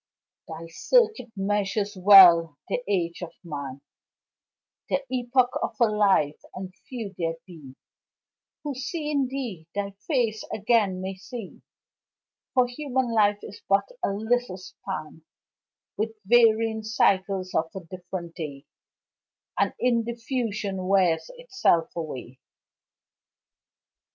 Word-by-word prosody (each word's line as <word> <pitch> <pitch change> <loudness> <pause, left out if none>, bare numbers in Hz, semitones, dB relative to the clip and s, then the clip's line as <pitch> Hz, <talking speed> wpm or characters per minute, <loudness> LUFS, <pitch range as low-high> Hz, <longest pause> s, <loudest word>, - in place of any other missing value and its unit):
Thy 165 +1 -7
circuit 435 - +2
measures 205 +1 -1
well 180 -5 +8
the - - -1
age 175 -4 -1
of 175 - -6
man, 140 -5 -6 1.1
The 275 - 0
epoch 250 0 +2
of - - -2
a 235 - +6
life 200 -9 +2 0.2
and 185 0 -7
few 225 -6 -6
there 165 -1 -1
be 150 -8 -13 0.9
Who 295 -2 -3
seeing 295 0 -2
thee, 240 -12 -5
thy 200 -1 -2 0.2
face 235 -8 0
again 205 -3 +1
may 190 +1 -3
see, 200 +2 -9 0.9
For 255 -1 +5
human 255 -1 -2
life 205 -2 +4
is 205 - -10
but 195 - +3
a - - +2
little 220 0 -1
span, 180 -4 -8 0.8
With 220 +1 -2
varying 225 0 +4
cycles 195 -3 +1
of 165 0 +1
a 190 - -5
different 175 -1 -7
day, 150 -4 -7 0.9
And - - +2
in 240 -2 +2
diffusion 225 -5 -3
wears 185 - +2
itself 390 - +1
away. 130 -6 -6
200 Hz, 115 wpm, -26 LUFS, 180-240 Hz, 1.1 s, well